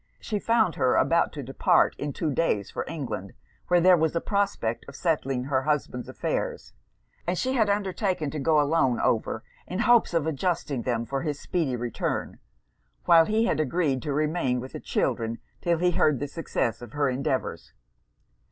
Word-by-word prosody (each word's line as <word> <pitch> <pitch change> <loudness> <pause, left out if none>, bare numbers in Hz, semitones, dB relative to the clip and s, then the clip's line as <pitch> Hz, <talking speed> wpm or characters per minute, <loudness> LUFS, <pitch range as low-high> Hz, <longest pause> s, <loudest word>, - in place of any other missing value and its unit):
She 210 -2 -3
found 220 -5 +2
her 130 - +3
about 170 0 +3
to 145 - -6
depart, 135 +2 +2
in 145 0 -2
two 155 +2 -2
days, 120 -10 0
for - - -3
England, 130 - -5 0.3
where 175 0 +4
there 180 +1 +6
was 160 -1 0
a - - +2
prospect 200 - -1
of - - -10
settling 135 -7 0
her 130 0 0
husband's 140 -4 -2
affairs; - - -3 0.5
and 175 +1 0
she 260 +6 0
had 220 -5 +2
undertaken 190 -6 -1
to 150 - -4
go 155 +2 +3
alone 145 -4 +2
over, 110 0 0 0.2
in 185 - -4
hopes 235 -5 +4
of 165 -3 +2
adjusting 155 -3 -1
them 115 -1 -1
for 135 +3 -3
his 150 -3 -3
speedy 160 -8 -1
return; 120 -1 -3 0.7
while 165 -2 +7
he 220 +2 +2
had 230 - 0
agreed 150 -3 0
to 150 - -3
remain 150 -3 0
with 130 +2 -7
the - - -5
children 115 0 -1 0.2
'till 170 -1 +1
he 180 +2 +2
heard 150 -5 +2
the 145 - -3
success 135 -7 -2
of 120 -2 -10
her 145 -1 +1
endeavours. 130 0 -2
150 Hz, 180 wpm, -26 LUFS, 130-175 Hz, 0.7 s, while